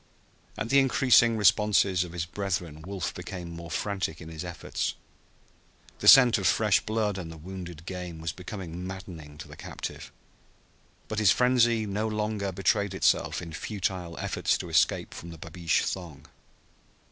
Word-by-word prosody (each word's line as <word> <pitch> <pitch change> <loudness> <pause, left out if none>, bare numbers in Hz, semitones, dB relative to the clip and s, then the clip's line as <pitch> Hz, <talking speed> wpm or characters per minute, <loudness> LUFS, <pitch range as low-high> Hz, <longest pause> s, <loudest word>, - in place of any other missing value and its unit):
At 115 - -3
the 140 - +6
increasing 125 -3 +4
responses 100 -3 +4
of 90 - -8
his 85 -2 -2
brethren 85 -4 -3
Wolf 95 +1 -4
became 90 -2 -7
more 85 0 -8
frantic 95 -1 -2
in 80 - -9
his 80 0 -6
efforts. 90 -1 -3 1.0
The - - -2
scent 125 -4 +9
of 95 - +1
fresh 105 -2 +3
blood 110 -3 -1
and 80 -3 -7
of 80 -2 -12
wounded 90 -4 -8
game 90 -3 -6
was 80 0 -3
becoming 90 -2 -7
maddening 85 -6 -9
to 75 - -9
the - - -11
captive. - - -7 1.0
But 110 - -2
his 105 -3 +5
frenzy 120 0 +3
no 105 +2 -2
longer 105 -2 -2
betrayed 95 +1 0
itself 95 - +1
in 85 -2 -8
futile 90 -3 -3
efforts - - 0
to - - -7
escape - - +2
from 85 - -9
the 85 - -9
babeesh 85 0 -1
thong. 80 -6 -5
95 Hz, 160 wpm, -28 LUFS, 85-105 Hz, 1.0 s, scent